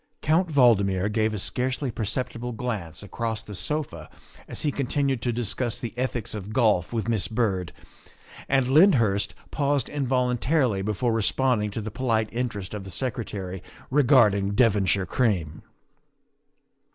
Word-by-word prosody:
Count 165 Hz, +3 st, +2 dB
Valdmir 105 Hz, -, +3 dB
gave 110 Hz, 0 st, +1 dB
a 105 Hz, -, -3 dB
scarcely 130 Hz, +6 st, -2 dB
perceptible 120 Hz, +2 st, -3 dB
glance 105 Hz, -8 st, -4 dB
across 115 Hz, +1 st, -4 dB
the 105 Hz, -, -9 dB
sofa 100 Hz, -, -4 dB, 0.4 s
as -, -, -5 dB
he 150 Hz, -, +1 dB
continued 135 Hz, -2 st, -1 dB
to 120 Hz, -, 0 dB
discuss 120 Hz, +1 st, -2 dB
the 120 Hz, -, -5 dB
ethics 125 Hz, -3 st, -2 dB
of 105 Hz, -1 st, -6 dB
golf 105 Hz, -8 st, +2 dB
with 115 Hz, -2 st, -2 dB
Miss 110 Hz, -6 st, +1 dB
Byrd, 100 Hz, -5 st, -1 dB, 0.8 s
and 135 Hz, -2 st, +3 dB
Lyndhurst 115 Hz, -, +4 dB, 0.2 s
paused 140 Hz, -3 st, 0 dB
involun 125 Hz, -3 st, 0 dB
tarily 125 Hz, -10 st, +1 dB
before 110 Hz, +3 st, 0 dB
responding 115 Hz, 0 st, +1 dB
to 105 Hz, +2 st, -4 dB
the 110 Hz, +1 st, -5 dB
polite 110 Hz, -4 st, 0 dB
interest 115 Hz, -6 st, -4 dB
of 105 Hz, -2 st, -5 dB
the 95 Hz, -, -9 dB
Secretary 100 Hz, -4 st, -4 dB, 0.3 s
regarding 115 Hz, -8 st, +4 dB
Devonshire 100 Hz, -4 st, +3 dB
cream. 90 Hz, -7 st, -1 dB
115 Hz, 140 wpm, -25 LUFS, 100-130 Hz, 0.8 s, Lyndhurst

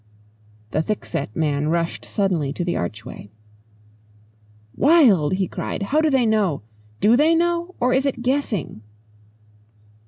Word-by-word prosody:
The 155 Hz, -, +1 dB
thickset 125 Hz, -, -4 dB
man 150 Hz, -2 st, 0 dB
rushed 170 Hz, +1 st, -1 dB
suddenly 180 Hz, -9 st, -1 dB
to 175 Hz, -, -3 dB
the 175 Hz, -, -1 dB
archway. 105 Hz, +3 st, -6 dB, 1.5 s
"Wild!" 245 Hz, -, +4 dB
he 190 Hz, -1 st, 0 dB
cried. -, -, -4 dB
"How 295 Hz, +10 st, +1 dB
do 315 Hz, -, +2 dB
they 265 Hz, -4 st, +2 dB
know? 205 Hz, -, +1 dB, 0.4 s
Do 220 Hz, +3 st, +5 dB
they 310 Hz, +5 st, +4 dB
know? 345 Hz, +1 st, 0 dB
Or 250 Hz, +1 st, +2 dB
is 265 Hz, +2 st, +2 dB
it 245 Hz, -3 st, -3 dB
guessing?" 250 Hz, -, -2 dB
205 Hz, 130 wpm, -22 LUFS, -, 1.5 s, Do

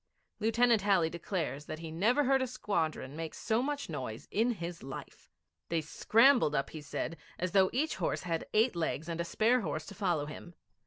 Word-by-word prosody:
Lieutenant 230 Hz, 0 st, +3 dB
Halley 190 Hz, -5 st, +3 dB
declares 165 Hz, -4 st, -3 dB
that 155 Hz, -, -5 dB
he 165 Hz, 0 st, -7 dB
never 225 Hz, -, +3 dB
heard 270 Hz, 0 st, +3 dB
a 260 Hz, -, 0 dB
squadron 160 Hz, -, -2 dB
make 160 Hz, 0 st, -5 dB
so 220 Hz, +2 st, 0 dB
much 285 Hz, +1 st, -2 dB
noise 125 Hz, -8 st, -5 dB
in 235 Hz, +3 st, +2 dB
his 170 Hz, -3 st, -6 dB
life. 135 Hz, 0 st, -9 dB, 0.4 s
They 165 Hz, -1 st, +1 dB
scrambled 225 Hz, -, +4 dB
up, 140 Hz, 0 st, -1 dB
he 155 Hz, -, -7 dB
said, 165 Hz, +3 st, -4 dB, 0.2 s
as 180 Hz, 0 st, -2 dB
though 190 Hz, 0 st, +5 dB
each 300 Hz, +6 st, 0 dB
horse -, -, -1 dB
had 165 Hz, -2 st, -2 dB
eight 220 Hz, 0 st, +3 dB
legs 160 Hz, -1 st, -2 dB
and 170 Hz, 0 st, -2 dB
a -, -, 0 dB
spare 225 Hz, +8 st, +2 dB
horse 155 Hz, -4 st, -3 dB
to -, -, -9 dB
follow 175 Hz, -7 st, 0 dB
him. 165 Hz, +3 st, -9 dB
175 Hz, 195 wpm, -32 LUFS, 160-225 Hz, 0.4 s, though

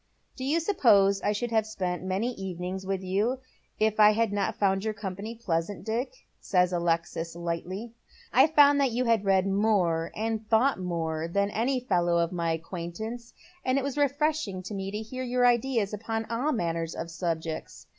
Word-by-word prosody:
" -, -, -44 dB
Do 260 Hz, -, -6 dB
you 295 Hz, +5 st, +2 dB
suppose 205 Hz, -, +4 dB
I -, -, +1 dB
should 230 Hz, +3 st, -2 dB
have 220 Hz, -1 st, +2 dB
spent 180 Hz, -5 st, -3 dB
many 190 Hz, +6 st, -1 dB
evenings 190 Hz, -1 st, -5 dB
with 195 Hz, -1 st, -2 dB
you 205 Hz, +7 st, 0 dB, 0.4 s
if 215 Hz, 0 st, +1 dB
I 210 Hz, 0 st, +8 dB
had 225 Hz, -1 st, +1 dB
not 200 Hz, -1 st, 0 dB
found 195 Hz, -1 st, +1 dB
your 220 Hz, -1 st, -2 dB
company 205 Hz, +2 st, -5 dB
pleasant, 185 Hz, -3 st, -2 dB
Dick? 240 Hz, -, -3 dB
" -, -, -44 dB
says 180 Hz, -1 st, +3 dB
Alexis, 165 Hz, -1 st, -1 dB
lightly. 175 Hz, +6 st, -4 dB, 0.2 s
" -, -, -25 dB
I 265 Hz, +4 st, +7 dB
found 290 Hz, -2 st, +5 dB
that 275 Hz, -, +3 dB
you 245 Hz, +2 st, -1 dB
had 225 Hz, -3 st, +2 dB
read 190 Hz, -1 st, +3 dB
more 195 Hz, -5 st, +1 dB
and 220 Hz, 0 st, -3 dB
thought 235 Hz, +2 st, +3 dB
more 165 Hz, -3 st, -2 dB
than 200 Hz, +4 st, 0 dB
any 255 Hz, +5 st, 0 dB
fellow 175 Hz, -7 st, +1 dB
of 170 Hz, -1 st, +1 dB
my 170 Hz, -2 st, -1 dB
acquaintance, 180 Hz, +8 st, -6 dB, 0.3 s
and 255 Hz, +1 st, +1 dB
it 275 Hz, -, 0 dB
was 280 Hz, -1 st, -3 dB
refreshing 290 Hz, -8 st, 0 dB
to 190 Hz, -, -7 dB
me 195 Hz, -1 st, -3 dB
to 205 Hz, -, -4 dB
hear 225 Hz, +4 st, -6 dB
your 250 Hz, 0 st, +1 dB
ideas 240 Hz, -3 st, +2 dB
upon 225 Hz, +1 st, -3 dB
all 250 Hz, +7 st, 0 dB
manner 165 Hz, -, -1 dB
of 170 Hz, -, -5 dB
subjects. 165 Hz, -1 st, -4 dB
205 Hz, 190 wpm, -28 LUFS, 180-235 Hz, 0.4 s, I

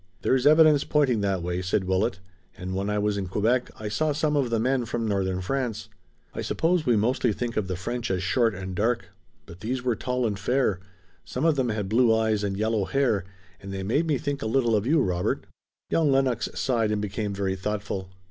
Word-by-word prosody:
"There's 130 Hz, +1 st, +3 dB
evidence 155 Hz, -1 st, +6 dB
pointing 135 Hz, -7 st, +2 dB
that 95 Hz, -3 st, 0 dB
way," 90 Hz, +1 st, -2 dB
said 95 Hz, +2 st, 0 dB
Willet, 95 Hz, +1 st, 0 dB, 0.4 s
"and 95 Hz, 0 st, -5 dB
when 100 Hz, +2 st, -1 dB
I 105 Hz, -, 0 dB
was 105 Hz, 0 st, 0 dB
in 95 Hz, -, -3 dB
Quebec 115 Hz, +7 st, +1 dB
I 110 Hz, -, -4 dB
saw 150 Hz, +9 st, 0 dB
some 150 Hz, 0 st, 0 dB
of 135 Hz, -4 st, +1 dB
the 115 Hz, -1 st, +1 dB
men 125 Hz, +1 st, +1 dB
from 115 Hz, 0 st, -2 dB
Northern 95 Hz, -2 st, 0 dB
France. 115 Hz, +1 st, -3 dB, 0.4 s
I -, -, -4 dB
suppose 165 Hz, -1 st, 0 dB
we 120 Hz, -, +4 dB
mostly 120 Hz, +2 st, +2 dB
think 120 Hz, +2 st, -3 dB
of 105 Hz, -3 st, -1 dB
the 95 Hz, -, -2 dB
French 120 Hz, +6 st, -4 dB
as 95 Hz, -1 st, -1 dB
short 115 Hz, +2 st, +2 dB
and 95 Hz, 0 st, -6 dB
dark, 110 Hz, 0 st, 0 dB, 0.4 s
but 85 Hz, -, -12 dB
these 125 Hz, +5 st, -3 dB
were 125 Hz, -2 st, +1 dB
tall 125 Hz, +2 st, -1 dB
and 105 Hz, -3 st, -2 dB
fair. 115 Hz, -3 st, +1 dB, 0.4 s
Some 130 Hz, +5 st, -3 dB
of 165 Hz, -2 st, +4 dB
them 130 Hz, -3 st, 0 dB
had 105 Hz, -3 st, -2 dB
blue 115 Hz, +3 st, +4 dB
eyes 110 Hz, -2 st, +1 dB
and 100 Hz, -1 st, -2 dB
yellow 110 Hz, -1 st, 0 dB
hair, 120 Hz, -9 st, +1 dB, 0.4 s
and 100 Hz, -, -8 dB
they 95 Hz, 0 st, -4 dB
made 140 Hz, -, +1 dB
me 150 Hz, -3 st, +2 dB
think 140 Hz, +1 st, -3 dB
a -, -, -2 dB
little 120 Hz, -1 st, +2 dB
of 105 Hz, +2 st, 0 dB
you, 155 Hz, +3 st, +4 dB
Robert." 90 Hz, -1 st, -1 dB, 0.5 s
Young 155 Hz, -4 st, +3 dB
Lennox 135 Hz, -3 st, +1 dB
sighed 115 Hz, -5 st, +1 dB
and 105 Hz, -, 0 dB
became 105 Hz, 0 st, -3 dB
very 95 Hz, -1 st, -1 dB
thoughtful. 100 Hz, -1 st, -4 dB
110 Hz, 215 wpm, -26 LUFS, 100-130 Hz, 0.5 s, evidence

